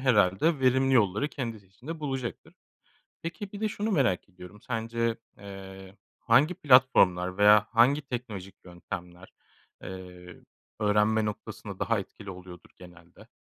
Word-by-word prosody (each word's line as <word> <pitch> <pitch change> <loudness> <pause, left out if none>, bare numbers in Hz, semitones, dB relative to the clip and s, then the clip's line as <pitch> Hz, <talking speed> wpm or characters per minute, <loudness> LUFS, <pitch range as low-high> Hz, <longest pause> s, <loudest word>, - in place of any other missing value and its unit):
herhâlde 130 - +3
verimli 130 +1 +3
yolları 105 +3 +2
kendisi 115 -9 -6
için 100 +8 -20
de 165 -1 -5
bulacaktır. 135 -5 -5 0.7
Peki, 190 +4 -6
bir 205 - -8
de 215 - +1
şunu 210 +1 -3
merak 125 - +1
ediyorum, 90 +2 -13
sence, 115 -1 -2 0.2
eee, 95 -1 -11 0.2
hangi 145 +10 +3
platformlar 95 - +4
veya 105 +1 +6
hangi 130 +6 +4
teknolojik 115 -8 -6
yöntemler, 90 0 -9 0.5
eee, 90 -1 -10 0.4
öğrenme 105 +1 +2
noktasında 105 -1 -6
daha - - 0
etkili 100 -2 -10
oluyordur 90 -1 -12
genelde? 90 -2 -16
105 Hz, 125 wpm, -28 LUFS, 95-130 Hz, 0.7 s, veya